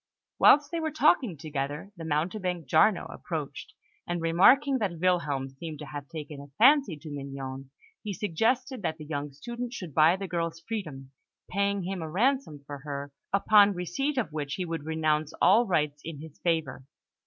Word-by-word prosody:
Whilst 290 0 +6
they 335 - -1
were 320 -1 -1
talking 290 - +2
together, 145 +4 -4
the 165 - -8
mountebank, 175 +3 -2
Giarno, - - +4
approached, - - -6 0.3
and 175 0 -2
remarking 245 - +4
that 190 -6 -2
Wilhelm 150 -7 0
seemed 155 +3 -7
to 150 - -8
have 145 0 -7
taken 150 -3 -7
a 140 - -11
fancy 265 - +5
to 155 +1 -10
Mignon, 135 -1 -6 0.3
he 210 - -4
suggested 230 - 0
that 160 -4 -2
the 155 - -9
young 145 -1 -4
student 240 - -6
should 180 - -7
buy 155 +4 +5
the 195 0 -5
girl's 170 -2 -2
freedom, 155 -10 -6 0.4
paying 200 0 0
him 185 0 -4
a 160 - -5
ransom 220 - 0
for 145 0 -7
her, 140 0 -6 0.2
upon 200 0 +5
receipt 180 - -2
of 225 -11 -1
which 145 -2 -3
he 185 - -3
would 165 -3 -4
renounce 155 -1 0
all 215 +7 +5
rights 150 -5 0
in 160 -3 -7
his 155 -1 -11
favour. 165 -5 -1
165 Hz, 175 wpm, -28 LUFS, 150-200 Hz, 0.4 s, Whilst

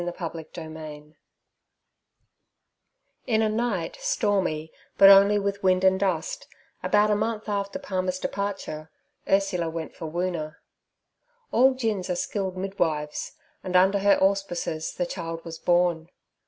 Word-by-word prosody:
Chapter 165 -2 -5
15 155 -2 -10 2.1
IN 220 -2 +2
a 215 - +2
night 215 - -2
stormy 195 - 0 0.3
but 195 - +9
only 200 +1 +7
with 200 0 -2
wind 185 -1 +3
and 190 0 +4
dust, 185 -5 -2 0.3
about 210 0 +3
a - - +3
month 220 +1 -2
after 200 -1 -2
Palmer's 185 -1 -2
departure, 190 -6 -4 0.4
Ursula 195 -4 +1
went 160 -1 -6
for 160 - -6
Woona. 170 -2 -3 1.0
All 260 +2 +4
gins 215 -7 -2
are 180 - 0
skilled 190 +1 -3
midwives, 160 -6 -2 0.3
and 185 -1 -4
under 190 +2 +5
her 200 +1 +4
auspices 190 -5 0
the 175 - -2
child 165 -2 -6
was 165 -1 -7
born. 175 -2 +1
185 Hz, 125 wpm, -26 LUFS, 165-200 Hz, 2.1 s, but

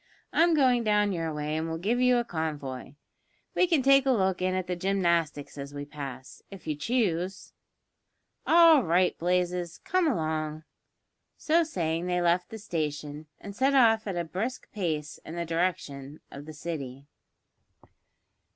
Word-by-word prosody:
"I'm 335 0 +4
going 255 -5 +3
down 210 -1 +2
your 165 -3 -2
way 150 0 -3
and 160 +1 -2
will 160 - -3
give 220 +9 0
you 250 -1 +4
a 240 - +1
convoy. 145 - -5 0.6
We 365 - +3
can 325 -6 +2
take 275 0 +5
a - - +5
look 190 -6 +1
in 185 0 0
at 185 -1 -1
the 180 0 -3
gymnastics 170 -6 0
as 140 +1 -7
we 145 0 -5
pass, 135 -3 -8
if 195 -2 -12
you 155 -1 -2
choose." 190 - -1 0.9
"All 330 -3 +7
right, 180 +1 +2
Blazes, 180 0 -1
come 365 -1 +1
along." 155 - -2 0.7
So 330 +2 +2
saying 170 - -2
they 180 0 0
left 175 +1 +1
the 225 - -7
station, 150 -5 -4
and 200 -1 -9
set 270 +4 +2
off 225 -4 +4
at 195 - -3
a 170 - 0
brisk 200 +10 -5
pace 155 -7 -3
in 165 - -8
the 170 0 -3
direction 155 -4 -3
of 145 +2 -10
the 155 - -8
City. 140 -4 -6
175 Hz, 160 wpm, -28 LUFS, 155-220 Hz, 0.9 s, All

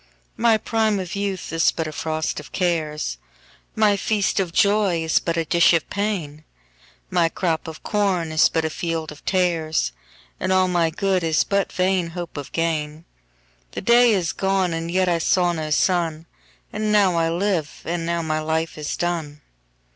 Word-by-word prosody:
1My 230 -1 +3
prime 220 -3 +1
of 185 +1 -5
youth 200 -4 -3
is 165 0 +3
but 160 - -3
a 155 - -5
frost 155 +1 -2
of 150 - -12
cares,2My 175 +5 -2
feast 205 -2 0
of 185 -3 -1
joy 200 -3 +2
is 160 - +2
but 170 -1 -2
a 165 - 0
dish 170 +2 +4
of 165 - +1
pain,3My 160 - -4
crop 165 -4 -1
of 160 -1 -9
corn 190 -6 0
is 155 - +4
but 160 -1 -1
a 160 - -2
field 165 -2 -3
of 150 - -13
tares,4And 155 - -2
all 185 0 +4
my 175 -2 +2
good 185 +2 0
is 160 -1 +2
but 200 -1 0
vain 185 -1 +1
hope 175 -1 -6
of 145 -2 -7
gain.5The 65 - -5
day 240 +1 +6
is 180 -5 0
gone 190 -2 0
and 165 0 -3
yet 185 +1 +1
I 170 -1 +2
saw 175 +1 +2
no 155 -2 -4
sun,6And 170 +5 -2
now 200 -4 +4
I 165 -1 +1
live, 170 -3 -2
and 170 0 -2
now 170 0 -1
my 155 -1 -1
life 160 0 -2
is 150 - -3
done. 160 -4 -3
170 Hz, 165 wpm, -22 LUFS, 155-190 Hz, -, day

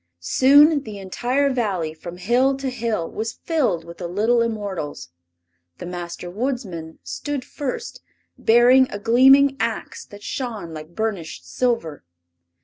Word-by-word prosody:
Soon 285 - +5
the 215 -6 -8
entire 250 +9 0
Valley, 195 -11 -1
from 170 +2 -9
hill 250 +8 +2
to 270 -1 -3
hill, 225 -8 -2
was 225 +1 -4
filled 255 - -1
with 170 0 -11
the 175 - -4
little 220 +7 +2
immortals. 200 - -4 0.7
The - - -8
Master 175 0 -6
Woodsman 190 -6 -4
stood 290 -3 -4
first, 290 - -5 0.3
bearing 245 +3 +5
a - - -4
gleaming 265 +5 +5
ax 230 - -3
that 205 0 -13
shone 220 -11 -5
like 155 +2 -10
burnished 180 - -4
silver. 230 - -1
225 Hz, 135 wpm, -22 LUFS, 175-260 Hz, 0.7 s, Soon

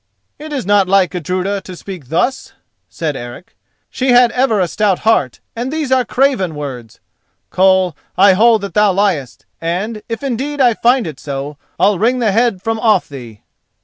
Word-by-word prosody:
'" - - -52
"It 310 - -8
is 275 -8 -3
not 200 -1 +3
like 195 -1 +3
Gudruda 185 +3 -3
to 185 - -10
speak 175 -6 -9
thus," 245 - -1 0.4
said 155 -4 -3
Eric: 120 +7 -9 0.4
"she 260 0 -2
had 245 -1 +5
ever 245 -4 +1
a 180 - +1
stout 200 +1 0
heart 145 - +1
and 245 +3 -4
these 305 -4 -3
are 260 -1 +3
craven 240 - 0
words. 125 -6 -8 0.5
Koll, 185 -3 +3 0.2
I 195 0 +6
hold 225 +2 +4
that 200 - -6
thou 210 -2 +3
liest; 180 - -1 0.2
and, 195 +7 -3
if 230 +3 -5
indeed 275 +3 -3
I 245 -3 +4
find 240 +2 +2
it 155 -5 -7
so, 140 +1 -6 0.2
I'll 195 -1 +3
wring 240 +5 +2
the 230 -4 +1
head 225 -3 +1
from 225 0 -2
off 215 -5 +2
thee!" 120 -7 -11
200 Hz, 180 wpm, -16 LUFS, 175-235 Hz, 0.5 s, I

